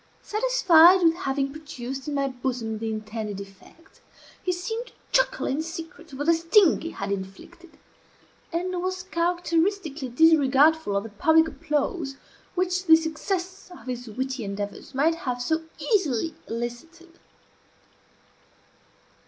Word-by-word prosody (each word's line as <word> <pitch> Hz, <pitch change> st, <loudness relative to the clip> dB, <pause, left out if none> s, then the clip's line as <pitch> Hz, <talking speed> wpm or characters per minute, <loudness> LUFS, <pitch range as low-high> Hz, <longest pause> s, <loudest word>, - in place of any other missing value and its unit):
Satisfied 380 Hz, -7 st, +5 dB
with 330 Hz, -1 st, +5 dB
having 275 Hz, -5 st, -2 dB
produced 270 Hz, -3 st, -7 dB
in 295 Hz, -, -2 dB
my 275 Hz, -1 st, +1 dB
bosom 245 Hz, -4 st, -3 dB
the 225 Hz, 0 st, -3 dB
intended 215 Hz, -2 st, -5 dB
effect, 200 Hz, -, -15 dB, 0.4 s
he 365 Hz, -, 0 dB
seemed 445 Hz, +7 st, -4 dB
to -, -, -17 dB, 0.2 s
chuckle -, -, +2 dB
in 280 Hz, +4 st, -1 dB
secret 330 Hz, -1 st, -8 dB
over 275 Hz, +2 st, -4 dB
the 335 Hz, -, +5 dB
sting 335 Hz, +3 st, +4 dB
he 330 Hz, -, -4 dB
had 200 Hz, -, -5 dB
inflicted, 200 Hz, -, -8 dB, 0.7 s
and 360 Hz, +1 st, -2 dB
was 370 Hz, 0 st, -3 dB
uncharacteristically 340 Hz, -4 st, -1 dB
disregardful 295 Hz, -3 st, +4 dB
of 200 Hz, -, -1 dB
the 225 Hz, -, -8 dB
public 320 Hz, +10 st, +4 dB
applause 295 Hz, -1 st, -2 dB, 0.4 s
which 365 Hz, 0 st, 0 dB
the 320 Hz, -, +9 dB
success 355 Hz, +4 st, -3 dB
of 355 Hz, -, -13 dB
his 245 Hz, -1 st, -5 dB
witty 260 Hz, +3 st, -4 dB
endeavours 205 Hz, +5 st, -6 dB
might 305 Hz, +5 st, +3 dB
have 255 Hz, -7 st, -4 dB
so 315 Hz, +6 st, 0 dB, 0.2 s
easily 325 Hz, -, 0 dB
elicited. 325 Hz, +10 st, -7 dB
320 Hz, 130 wpm, -25 LUFS, 250-350 Hz, 0.7 s, the